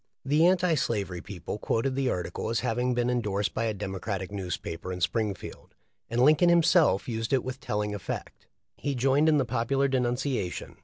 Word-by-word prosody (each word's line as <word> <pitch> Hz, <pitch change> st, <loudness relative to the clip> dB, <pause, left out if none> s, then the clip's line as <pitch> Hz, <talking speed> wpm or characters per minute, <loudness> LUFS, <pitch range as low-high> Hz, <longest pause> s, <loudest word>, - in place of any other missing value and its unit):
The 150 Hz, +5 st, +4 dB
anti 180 Hz, -2 st, +3 dB
slavery 100 Hz, -, -1 dB
people 100 Hz, +1 st, -6 dB
quoted 120 Hz, +6 st, 0 dB
the 135 Hz, -1 st, 0 dB
article 90 Hz, +3 st, -3 dB
as 115 Hz, -2 st, 0 dB
hav 115 Hz, +1 st, -1 dB
ing 125 Hz, 0 st, +1 dB
been 120 Hz, 0 st, +1 dB
endorsed 105 Hz, -5 st, 0 dB
by 115 Hz, -, -1 dB
a 110 Hz, -, 0 dB
Demoratic 95 Hz, -1 st, -4 dB
newspaper 90 Hz, -2 st, -5 dB
in 90 Hz, -, -4 dB
Springfield, 100 Hz, +4 st, -3 dB, 0.3 s
and 115 Hz, -, -1 dB
Linoln 155 Hz, +5 st, +5 dB
himself 170 Hz, -, +4 dB
used 115 Hz, -2 st, -3 dB
it 130 Hz, -, +2 dB
with 130 Hz, +1 st, -5 dB
telling 105 Hz, -3 st, -2 dB
effect. 100 Hz, -4 st, -6 dB, 0.3 s
He 140 Hz, -1 st, -2 dB
joined 135 Hz, +5 st, +3 dB
in 155 Hz, -, +4 dB
the 135 Hz, -, +2 dB
popular 130 Hz, +3 st, +1 dB
denunciation. 125 Hz, -6 st, -2 dB
120 Hz, 175 wpm, -28 LUFS, 100-135 Hz, 0.3 s, Linoln